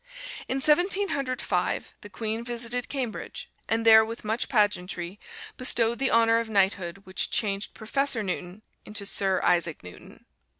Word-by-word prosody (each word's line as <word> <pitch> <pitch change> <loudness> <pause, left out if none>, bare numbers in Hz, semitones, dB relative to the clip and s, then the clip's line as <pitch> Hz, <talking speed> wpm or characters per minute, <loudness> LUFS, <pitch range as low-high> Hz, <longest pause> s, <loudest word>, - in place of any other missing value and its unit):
In 265 +1 -2
Seventeen 370 +7 +4
Hundred 265 -3 -3
Five - - -2
the 205 - -10
Queen 220 +3 -3
visited 240 0 -2
Cambridge, 255 -6 -5 0.2
and 225 +1 0
there 220 -1 +8
with 225 0 -7
much 220 +3 -1
pageantry 195 -4 -1 0.4
bestowed 235 -2 +2
the 270 - +1
honor 230 0 +4
of 230 -1 -4
Knighthood 195 -3 0
which 185 -1 0
changed 200 -4 -1
Professor 235 +1 0
Newton 185 +1 -5 0.2
into 210 -1 -2
Sir 195 -1 0
Isaac 170 - +1
Newton. 90 -1 -13
220 Hz, 145 wpm, -26 LUFS, 195-240 Hz, 0.4 s, there